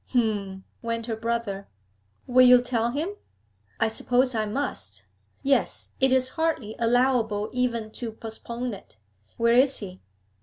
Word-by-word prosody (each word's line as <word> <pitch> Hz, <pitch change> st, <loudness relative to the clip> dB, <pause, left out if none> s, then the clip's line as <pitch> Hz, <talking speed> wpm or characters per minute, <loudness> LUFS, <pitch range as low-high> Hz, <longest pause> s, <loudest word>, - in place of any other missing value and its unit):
'H'm!' 200 Hz, -5 st, 0 dB, 0.2 s
went 230 Hz, 0 st, -3 dB
her 225 Hz, -2 st, -2 dB
brother. 225 Hz, -3 st, -3 dB, 0.6 s
'Will 255 Hz, 0 st, +6 dB
you 250 Hz, 0 st, +9 dB
tell 240 Hz, -2 st, 0 dB
him?' 310 Hz, +10 st, -2 dB, 0.7 s
'I 225 Hz, -, +3 dB
suppose 250 Hz, +3 st, +1 dB
I 215 Hz, -2 st, 0 dB
must. 100 Hz, -, -3 dB, 0.4 s
Yes, 275 Hz, 0 st, +1 dB
it 265 Hz, -1 st, +3 dB
is 260 Hz, 0 st, +3 dB
hardly 310 Hz, -9 st, -1 dB
allowable 230 Hz, -3 st, +2 dB
even 235 Hz, -3 st, -1 dB
to 230 Hz, 0 st, -5 dB
postpone 235 Hz, +2 st, -6 dB
it. 195 Hz, -, -12 dB, 0.4 s
Where 235 Hz, 0 st, +3 dB
is 265 Hz, +2 st, +4 dB
he?' 190 Hz, -3 st, -7 dB
235 Hz, 140 wpm, -26 LUFS, 215-250 Hz, 0.7 s, you